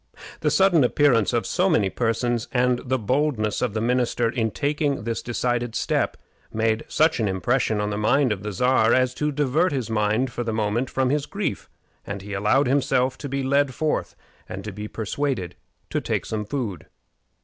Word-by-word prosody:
The - - +1
sudden 190 -6 +4
appearance 125 -4 +3
of 120 -2 0
so 185 +2 +1
many 105 - +2
persons, 120 0 -1
and 125 -1 +2
the 130 +1 -1
boldness 125 -2 0
of 120 -4 -1
the 110 - 0
minister 120 0 +1
in 115 -3 0
taking 145 +2 -1
this 115 0 -2
decided 120 0 -2
step, - - 0 0.3
made 110 0 0
such 155 -2 +2
an 110 - +1
impression 110 +4 0
on 105 0 -1
the 105 - -2
mind 130 +4 +3
of 100 -3 -2
the 105 0 -4
Czar 120 +2 +3
as 130 -1 +2
to 150 +3 -1
divert 150 +5 +1
his 130 -6 -3
mind 110 +4 +1
for 120 -1 -3
the 115 - -2
moment 110 +3 0
from 130 -1 0
his 145 -1 0
grief, 200 - -3 0.3
and 100 -1 -6
he 105 0 -7
allowed 105 +8 +2
himself 130 -1 +1
to 140 - -5
be 135 0 -2
led 140 0 +1
forth 155 -1 -1 0.3
and 95 +1 -6
to 110 - -5
be 105 +2 -6
persuaded 110 - -3 0.4
to - - 0
take - - -2
some 105 -1 -3
food. 105 - -4
120 Hz, 190 wpm, -24 LUFS, 110-135 Hz, 0.4 s, sudden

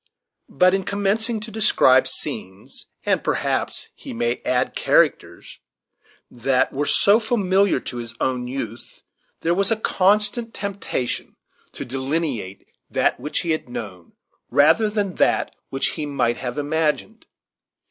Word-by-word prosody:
But 180 +6 +4
in 195 0 +1
commencing 210 +4 0
to 220 +1 -7
describe 200 -12 +4
scenes, 95 +1 -5 0.2
and - - +1
perhaps - - -1
he - - -9
may 120 +1 -1
add 125 0 0
characters, - - +1 0.7
that 130 +2 +1
were 145 +2 -1
so 205 +3 +4
familiar 200 - +2
to 125 - -6
his 120 -1 -6
own 125 -2 -1
youth, 120 -3 -7 0.4
there 170 - +1
was 195 +2 +1
a 225 - +3
constant 210 +3 +1
temptation 200 -11 -3 0.4
to - - -6
delineate 130 - -3 0.2
that - - +1
which 150 - -2
he 170 - -1
had 155 -5 -2
known, 95 -8 -8 0.4
rather 210 +10 +4
than 205 -3 -1
that - - +2 0.2
which 135 - 0
he 155 -2 -4
might 120 -4 0
have 125 -1 -5
imagined. 155 +8 -1
150 Hz, 135 wpm, -22 LUFS, 125-200 Hz, 0.7 s, But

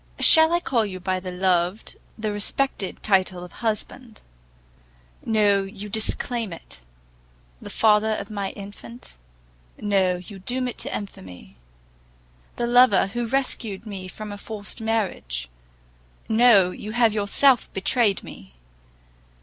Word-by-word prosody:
Shall 320 0 +8
I 345 - +2
call 245 -9 0
you 190 -3 -5
by 185 0 -2
the 185 0 -6
loved, 180 +2 0 0.2
the 215 -1 -3
respected 205 0 -2
title 190 -3 +1
of 180 - -11
husband? 225 +2 -5 1.0
No, 210 -3 +2
you 195 +1 -7
disclaim 220 +1 0
it! 165 - -11 0.8
the - - -9
father 215 0 +3
of 200 +1 -7
my 200 -2 -3
infant? 120 - -11 0.6
No, 195 -3 +1
you 185 +2 -10
doom 250 +6 -2
it 245 - -7
to - - -3
infamy! 90 - -11 1.0
the 240 - -2
lover 240 -5 +5
who 240 -1 -2
rescued 230 -5 -2
me 195 -3 -7
from 210 +3 -8
a 205 - -8
forced 210 +1 -7
marriage? 190 - -2 0.8
No, 220 -5 +5
you 210 +3 -8
have 230 -2 +3
yourself 220 +5 +3
betrayed 200 +1 +1
me! 65 0 -12
205 Hz, 130 wpm, -23 LUFS, 185-225 Hz, 1.0 s, Shall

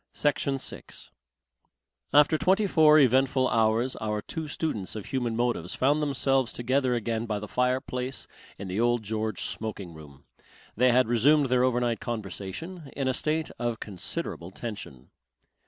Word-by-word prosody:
Section 140 -2 0
6 - - -8 1.0
After 150 +2 +5
twenty 190 +6 +2
four 155 -5 +6
eventful 130 -1 +4
hours 115 +3 +2
our 105 -1 -2
two 160 +9 -5
students 145 - -3
of 105 - -6
human 120 -4 -2
motives 120 -7 -1
found 145 +4 +2
themselves 135 -3 +1
together 130 +1 0
again 115 0 -2
by 105 -1 -1
the 105 +1 -6
fireplace 125 +2 -2 0.3
in 100 - -7
the 95 +3 -3
Old 120 -1 +2
George 110 0 -3
smoking 100 -5 -5
room. 75 -3 -14 0.5
They 125 +3 +4
had 125 -1 +4
resumed 135 +5 +4
their 125 0 +3
overnight 120 -2 +1
conversation, 120 - -6
in 135 -2 -1
a 130 - +2
state 155 +4 -1
of 120 -1 -2
considerable 90 -3 -5
tension. 95 - -8
120 Hz, 145 wpm, -27 LUFS, 110-135 Hz, 1.0 s, four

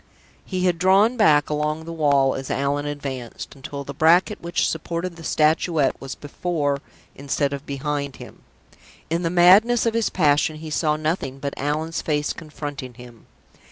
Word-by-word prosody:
He 185 -1 -2
had 175 -2 +1
drawn 195 +6 +4
back 150 - +4
along 150 +1 -2
the 165 - -6
wall 140 -4 +3
as 135 0 -6
Allan 140 +2 -1
advanced, 135 -5 -6
until 140 0 -7
the 140 - -7
bracket 170 +8 +3
which 170 0 0
supported 170 +2 -3
the 165 - -12
Statuette 155 -2 +1
was 135 -1 -6
before 145 -1 -2 0.3
instead 140 0 -1
of 140 0 -7
behind 140 0 -3
him. - - -12 0.7
In 170 +1 +1
the 170 - 0
madness 195 +8 +5
of 230 - +1
his 230 -1 +1
passion 155 -1 +2
he 155 0 -8
saw 150 0 +1
nothing 155 -3 -2
but 140 0 -4
Allan's 155 +4 -2
face 150 -1 -1
confronting 145 -5 -7
him. 120 -1 -14
150 Hz, 160 wpm, -23 LUFS, 140-170 Hz, 0.7 s, madness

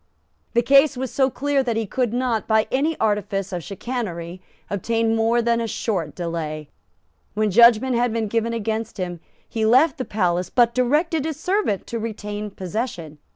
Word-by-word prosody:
The 235 0 +3
case 275 +2 +5
was 260 -1 -3
so 265 0 +2
clear 280 +1 0
that 235 -4 -1
he 225 - -1
could 245 +2 -1
not, 245 -3 -1
by 220 -1 +3
any 300 +5 0
artifice 200 -2 -1
of 175 -2 -3
chicanery, 185 -5 -5 0.3
obtain 225 +3 0
more 230 +1 +2
than 235 0 +1
a 230 - -2
short 185 -8 -3
delay. 160 -3 -4 0.7
When 215 -1 +1
judgment 235 +4 +6
had 240 0 +1
been 225 -1 -1
given 230 +2 0
against 225 0 -3
him, 175 -2 -4 0.3
he 225 -1 -3
left 260 +8 +4
the - - 0
palace, 180 -3 0
but 235 0 +3
directed 295 +6 +1
his 310 -1 -4
steward 365 - 0
to 230 - -4
retain 210 -1 -5
possession. 185 - -5
225 Hz, 170 wpm, -22 LUFS, 200-250 Hz, 0.7 s, judgment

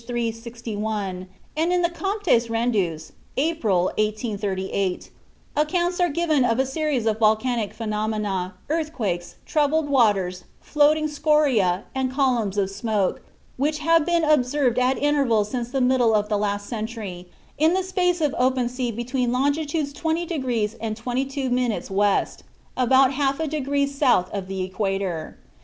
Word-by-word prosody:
361, 225 -5 -4 0.3
and 325 +3 +1
in 360 0 +2
the 345 - +3
Comptes 375 - +1
Rendus, 205 -9 -1 0.3
April, 260 - +1 0.2
1838, 200 -3 -2 0.4
accounts 345 +4 0
are 355 -1 +3
given 310 -3 +1
of 230 -2 +2
a 265 - +2
series 275 -3 -1
of 220 -1 0
volcanic 220 0 +2
phenomena, 210 -4 -2
earthquakes, 255 - -2
troubled 305 0 +1
water, 210 -10 +3 0.3
floating 305 +1 +2
scoria, 285 - +2
and 260 -1 -1
columns 245 -7 +1
of 195 -1 +1
smoke, 205 -1 -1 0.4
which 300 +3 0
have 330 +1 +3
been 340 0 +1
observed 275 -4 +2
at 255 +1 +2
intervals 265 -8 +2
since 245 -2 -3
the 270 +2 -1
middle 250 -3 +3
of 210 0 0
the 210 - +1
last 205 0 -1
century, 215 -6 -6 0.3
in 320 +4 +4
a 380 - 0
space 360 -2 0
of 295 -3 +1
open 255 -1 +2
sea 250 -1 -2
between 240 +2 -1
longitudes 285 +3 0
20° 290 -9 -1
and 220 -1 -3
22' 265 +3 -2
W., 210 -5 +1 0.5
about 260 +1 +4
half 275 +1 0
a 320 - -1
degree 285 -1 0
south 275 -9 +1
of 195 -2 -4
the 190 -1 -3
equator. 190 -3 -3
245 Hz, 140 wpm, -23 LUFS, 210-295 Hz, 0.5 s, in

